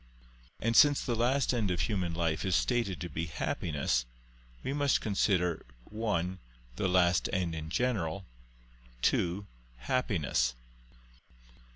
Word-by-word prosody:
And 115 Hz, +1 st, 0 dB
since 145 Hz, +1 st, +7 dB
the 120 Hz, -, 0 dB
last 125 Hz, +4 st, +2 dB
end 110 Hz, -5 st, 0 dB
of 90 Hz, -2 st, 0 dB
human 90 Hz, -6 st, -1 dB
life 85 Hz, -2 st, 0 dB
is 95 Hz, -3 st, +1 dB
stated 115 Hz, -5 st, 0 dB
to 90 Hz, -, -3 dB
be 80 Hz, +1 st, -4 dB
happiness, 70 Hz, -5 st, -1 dB, 0.6 s
we 135 Hz, -, -2 dB
must 145 Hz, -1 st, +2 dB
consider 95 Hz, -5 st, +1 dB, 0.3 s
(1) 95 Hz, -5 st, -1 dB, 0.4 s
the 80 Hz, -, 0 dB
last 90 Hz, -1 st, +3 dB
end 90 Hz, -3 st, -1 dB
in 80 Hz, -1 st, -5 dB
general; 95 Hz, -7 st, -1 dB, 0.8 s
(2) 90 Hz, +4 st, +1 dB, 0.3 s
happiness. 75 Hz, -, 0 dB
95 Hz, 120 wpm, -31 LUFS, 85-115 Hz, 0.8 s, since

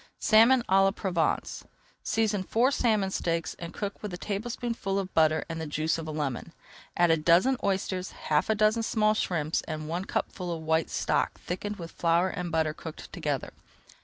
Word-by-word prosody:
SALMON 230 Hz, +3 st, +5 dB
À 190 Hz, +1 st, +5 dB
LA 195 Hz, -, +5 dB
PROVENCE 185 Hz, -4 st, -1 dB, 0.4 s
Season 215 Hz, -3 st, 0 dB
four 235 Hz, +7 st, +2 dB
salmon 215 Hz, -8 st, +1 dB
steaks 165 Hz, -2 st, -1 dB
and 170 Hz, -1 st, -6 dB
cook 200 Hz, +1 st, -5 dB
with 210 Hz, -, -5 dB
a 175 Hz, -, -5 dB
tablespoonful 220 Hz, 0 st, -3 dB
of 190 Hz, -1 st, -3 dB
butter 155 Hz, -1 st, +3 dB
and 165 Hz, -1 st, -5 dB
the 160 Hz, -, -4 dB
juice 155 Hz, +2 st, -1 dB
of 160 Hz, -, -6 dB
a -, -, -3 dB
lemon. 150 Hz, +1 st, -3 dB, 0.4 s
Add 175 Hz, -1 st, +4 dB
a 165 Hz, -, +4 dB
dozen 170 Hz, +12 st, +4 dB
oysters, 190 Hz, -1 st, -1 dB
half 150 Hz, +4 st, -1 dB
a 220 Hz, -, +3 dB
dozen 215 Hz, +2 st, +3 dB
small 215 Hz, -1 st, +2 dB
shrimps, 165 Hz, -7 st, -1 dB
and 155 Hz, -1 st, -4 dB
one 175 Hz, +4 st, -3 dB
cupful 180 Hz, -2 st, -3 dB
of 165 Hz, -1 st, -4 dB
white 160 Hz, 0 st, +1 dB
stock -, -, 0 dB
thickened 205 Hz, +4 st, -4 dB
with 170 Hz, -4 st, -8 dB
flour 170 Hz, +2 st, +2 dB
and 180 Hz, -2 st, -4 dB
butter 160 Hz, -2 st, +1 dB
cooked 160 Hz, 0 st, -9 dB
together. 150 Hz, -6 st, -3 dB
180 Hz, 185 wpm, -28 LUFS, 160-210 Hz, 0.4 s, SALMON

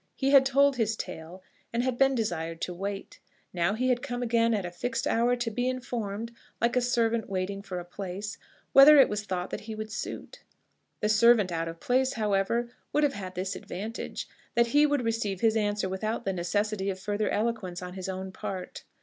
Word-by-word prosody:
He 270 Hz, 0 st, +1 dB
had 270 Hz, -1 st, +7 dB
told 275 Hz, 0 st, +4 dB
his 225 Hz, -2 st, +1 dB
tale, 175 Hz, -1 st, -8 dB, 0.3 s
and 235 Hz, +1 st, 0 dB
had 255 Hz, -1 st, 0 dB
been 270 Hz, +1 st, +3 dB
desired 165 Hz, -7 st, -2 dB
to 180 Hz, -, -2 dB
wait. 195 Hz, +2 st, -5 dB, 0.3 s
Now 175 Hz, +3 st, +1 dB
he 255 Hz, +3 st, 0 dB
had 245 Hz, -1 st, +2 dB
come 245 Hz, -3 st, -3 dB
again 230 Hz, -1 st, +2 dB
at 205 Hz, -4 st, 0 dB
a 175 Hz, -, -5 dB
fixed 230 Hz, +6 st, -3 dB
hour 240 Hz, +2 st, +2 dB
to 240 Hz, -2 st, -2 dB
be 245 Hz, +3 st, 0 dB
informed 230 Hz, -4 st, -4 dB, 0.3 s
like 235 Hz, +2 st, +1 dB
a 250 Hz, -, +3 dB
servant 235 Hz, -2 st, +1 dB
waiting 195 Hz, +1 st, -2 dB
for 195 Hz, -2 st, -6 dB
a 175 Hz, -, -8 dB
place 195 Hz, +3 st, -6 dB, 0.3 s
whether 285 Hz, +2 st, +10 dB
it 270 Hz, -, +7 dB
was 210 Hz, 0 st, -2 dB
thought 180 Hz, -2 st, -3 dB
that -, -, -4 dB
he 220 Hz, -, -4 dB
would 215 Hz, 0 st, -6 dB
suit. -, -, -6 dB, 0.6 s
The 210 Hz, -, +1 dB
servant 215 Hz, -3 st, +5 dB
out 165 Hz, 0 st, -2 dB
of 165 Hz, 0 st, -7 dB
place, 260 Hz, +2 st, +1 dB
however, 220 Hz, +2 st, 0 dB, 0.2 s
would 300 Hz, -, +2 dB
have 285 Hz, -2 st, +3 dB
had 185 Hz, -2 st, -7 dB
this 185 Hz, +2 st, -2 dB
advantage, 215 Hz, +6 st, -6 dB, 0.3 s
that 235 Hz, -, +5 dB
he 295 Hz, +1 st, +6 dB
would 285 Hz, -4 st, 0 dB
receive 220 Hz, -5 st, -1 dB
his 225 Hz, -1 st, +3 dB
answer 205 Hz, -2 st, 0 dB
without 215 Hz, +5 st, -3 dB
the 195 Hz, -, 0 dB
necessity 200 Hz, +3 st, -1 dB
of 190 Hz, -1 st, -3 dB
further 205 Hz, +2 st, -1 dB
eloquence 210 Hz, -5 st, -1 dB
on 180 Hz, 0 st, -7 dB
his 190 Hz, 0 st, -5 dB
own 190 Hz, 0 st, -5 dB
part. 185 Hz, -1 st, -6 dB
215 Hz, 205 wpm, -28 LUFS, 190-240 Hz, 0.6 s, whether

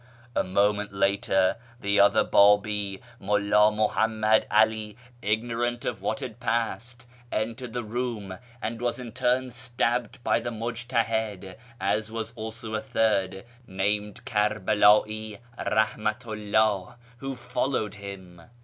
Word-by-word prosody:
A -, -, +2 dB
moment 105 Hz, +2 st, +1 dB
later 95 Hz, -1 st, +2 dB, 0.2 s
the 100 Hz, -2 st, +1 dB
other 100 Hz, -, +6 dB
Babi, 105 Hz, -1 st, +3 dB, 0.2 s
Mulla 105 Hz, +1 st, +3 dB
^luhammad 110 Hz, 0 st, +2 dB
'Ali, 110 Hz, 0 st, +2 dB, 0.2 s
ignorant 120 Hz, +3 st, -1 dB
of 115 Hz, -, -3 dB
what 110 Hz, -, -2 dB
had 120 Hz, -3 st, -6 dB
passed, 120 Hz, +1 st, -2 dB, 0.3 s
entered 115 Hz, +2 st, -3 dB
the 120 Hz, -1 st, -2 dB
room, 110 Hz, -4 st, -4 dB, 0.2 s
and 115 Hz, +2 st, -3 dB
was 120 Hz, -1 st, 0 dB
in 125 Hz, -2 st, -7 dB
turn 125 Hz, +1 st, +1 dB
stabbed 120 Hz, -1 st, -1 dB
by -, -, +2 dB
the -, -, -4 dB
Mujtahid, 115 Hz, -4 st, -2 dB, 0.2 s
as 105 Hz, +3 st, 0 dB
was 115 Hz, 0 st, -4 dB
also 110 Hz, 0 st, -6 dB
a 110 Hz, -, -1 dB
third, 95 Hz, -4 st, 0 dB, 0.2 s
named 105 Hz, +2 st, -2 dB
Kerbela'i 105 Hz, 0 st, +2 dB, 0.2 s
Eahmatu 110 Hz, 0 st, -1 dB
'llah 110 Hz, 0 st, +2 dB, 0.2 s
who 135 Hz, +1 st, -5 dB
followed 120 Hz, -3 st, -2 dB
him. 95 Hz, -4 st, -9 dB
110 Hz, 120 wpm, -27 LUFS, 105-115 Hz, 0.3 s, other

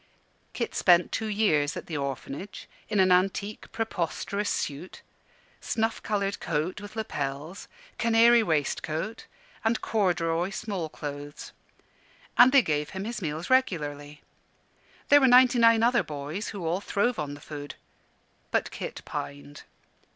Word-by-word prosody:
Kit -, -, -3 dB
spent 175 Hz, -1 st, +4 dB
two 220 Hz, -, -2 dB
years 200 Hz, -9 st, +1 dB
at -, -, -6 dB
the 160 Hz, -, -6 dB
Orphanage 140 Hz, +6 st, -5 dB, 0.2 s
in 210 Hz, -2 st, +1 dB
an 185 Hz, -1 st, +5 dB
antique, 195 Hz, +3 st, 0 dB
preposterous 200 Hz, -1 st, -2 dB
suit 145 Hz, +6 st, -4 dB, 0.6 s
snuff 225 Hz, 0 st, -1 dB
coloured 200 Hz, -2 st, -1 dB
coat 160 Hz, +5 st, -2 dB
with 205 Hz, +1 st, -10 dB
lappels, 150 Hz, -5 st, -4 dB, 0.3 s
canary 230 Hz, +1 st, +5 dB
waistcoat, 160 Hz, +2 st, -2 dB, 0.4 s
and 225 Hz, +1 st, +1 dB
corduroy 175 Hz, -4 st, 0 dB
small 195 Hz, -5 st, -4 dB
clothes. 145 Hz, 0 st, -7 dB, 0.8 s
And 250 Hz, +1 st, +8 dB
they 275 Hz, -2 st, +6 dB
gave 150 Hz, -3 st, -1 dB
him 195 Hz, -, -4 dB
his 230 Hz, -1 st, -5 dB
meals 160 Hz, +4 st, -4 dB
regularly. 150 Hz, -, 0 dB, 0.9 s
There 290 Hz, 0 st, +7 dB
were 265 Hz, -, +6 dB
ninety 250 Hz, 0 st, +6 dB
nine 230 Hz, -1 st, +5 dB
other 240 Hz, +1 st, +4 dB
boys 150 Hz, +7 st, -5 dB
who 195 Hz, -5 st, -6 dB
all 175 Hz, +4 st, 0 dB
throve 210 Hz, +2 st, 0 dB
on 145 Hz, -1 st, -4 dB
the -, -, -12 dB
food: 145 Hz, 0 st, -8 dB, 0.7 s
but -, -, 0 dB
Kit -, -, -6 dB
pined. 70 Hz, 0 st, -7 dB
185 Hz, 135 wpm, -27 LUFS, 150-220 Hz, 0.9 s, And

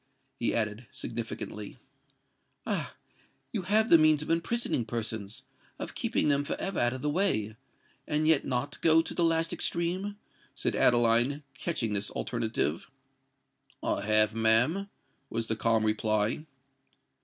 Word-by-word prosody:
he -, -, +1 dB
added, -, -, -2 dB
significantly. -, -, -5 dB, 0.9 s
"Ah! -, -, -2 dB, 0.6 s
you 215 Hz, -, -1 dB
have 215 Hz, +5 st, +1 dB
the 170 Hz, -, +9 dB
means 155 Hz, -1 st, +4 dB
of 155 Hz, -, -3 dB
imprisoning 170 Hz, -, 0 dB
persons—of 110 Hz, -2 st, -6 dB
keeping -, -, 0 dB
them 145 Hz, -1 st, +2 dB
for -, -, -3 dB
ever 195 Hz, -1 st, -2 dB
out 120 Hz, +1 st, +2 dB
of 130 Hz, -, -7 dB
the 150 Hz, -, +1 dB
way—and 150 Hz, -, -2 dB
yet 160 Hz, -3 st, +4 dB
not 130 Hz, +2 st, -3 dB
go 165 Hz, 0 st, +5 dB
to -, -, -5 dB
the 175 Hz, -, 0 dB
last 165 Hz, 0 st, +1 dB
extreme?" 185 Hz, +4 st, -1 dB, 0.4 s
said -, -, -1 dB
Adeline, 120 Hz, +4 st, +3 dB
catching 130 Hz, -5 st, -2 dB
at 105 Hz, -, +1 dB
this 100 Hz, 0 st, -1 dB
alternative. 110 Hz, -, -2 dB, 0.9 s
"I -, -, 0 dB
have, 110 Hz, 0 st, +2 dB
ma'am," 120 Hz, -, +4 dB, 0.4 s
was 115 Hz, 0 st, -2 dB
the 110 Hz, -, -1 dB
calm 115 Hz, 0 st, +1 dB
reply. 110 Hz, +6 st, 0 dB
130 Hz, 135 wpm, -29 LUFS, 110-165 Hz, 0.9 s, the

